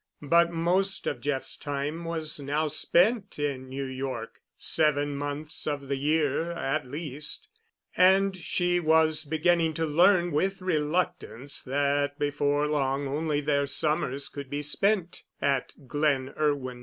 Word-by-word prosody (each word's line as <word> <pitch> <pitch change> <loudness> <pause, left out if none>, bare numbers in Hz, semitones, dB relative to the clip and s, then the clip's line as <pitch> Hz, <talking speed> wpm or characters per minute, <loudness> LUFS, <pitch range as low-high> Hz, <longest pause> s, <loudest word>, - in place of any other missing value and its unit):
But 170 +3 +4
most 180 +4 +1
of 120 -4 -3
Jeff's 135 -1 -2
time 145 +4 -4
was 160 -2 -3
now 145 +3 -1
spent 200 - +2
in 140 -3 -3
New 135 +1 -4
York—seven 135 +3 -1
months 145 +2 -3
of 140 -2 -3
the 140 - +1
year 150 +3 0
at 150 -4 -2
least—and 190 - 0
she 175 0 0
was 160 -1 +3
beginning 160 +1 +1
to 165 - 0
learn 175 +3 +4
with 190 +6 0
reluctance 160 -5 -2
that 145 +1 0
before 145 0 +1
long 140 -2 0
only 150 +1 -1
their 140 -1 +1
summers 140 -2 0
could 140 -2 -8
be 145 +1 -3
spent 185 +4 +1 0.2
at 140 -2 0
"Glen 140 -1 0
Irwin." 140 -5 -1
150 Hz, 130 wpm, -27 LUFS, 140-170 Hz, 0.2 s, But